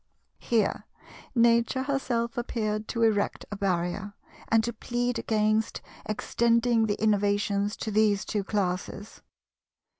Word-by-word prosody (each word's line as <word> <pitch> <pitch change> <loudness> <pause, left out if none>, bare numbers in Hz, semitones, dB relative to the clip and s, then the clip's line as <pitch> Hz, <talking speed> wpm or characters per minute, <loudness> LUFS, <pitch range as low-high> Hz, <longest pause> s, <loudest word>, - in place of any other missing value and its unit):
Here 220 -4 0 0.5
Nature 235 +2 +3
herself 245 -4 -1
appeared 215 -3 -2
to 230 -1 -1
erect 210 -3 +1
a - - -3
barrier, 195 +1 -2 0.3
and 225 -1 +3
to 235 +1 -2
plead 245 +2 -2
against 215 0 +1 0.3
extending 230 +1 +2
the 205 - -1
innovations 205 -1 +1
to 220 - -4
these 210 -1 +2
two 205 -2 -2
classes. 195 +1 -3
215 Hz, 115 wpm, -27 LUFS, 205-235 Hz, 0.5 s, Nature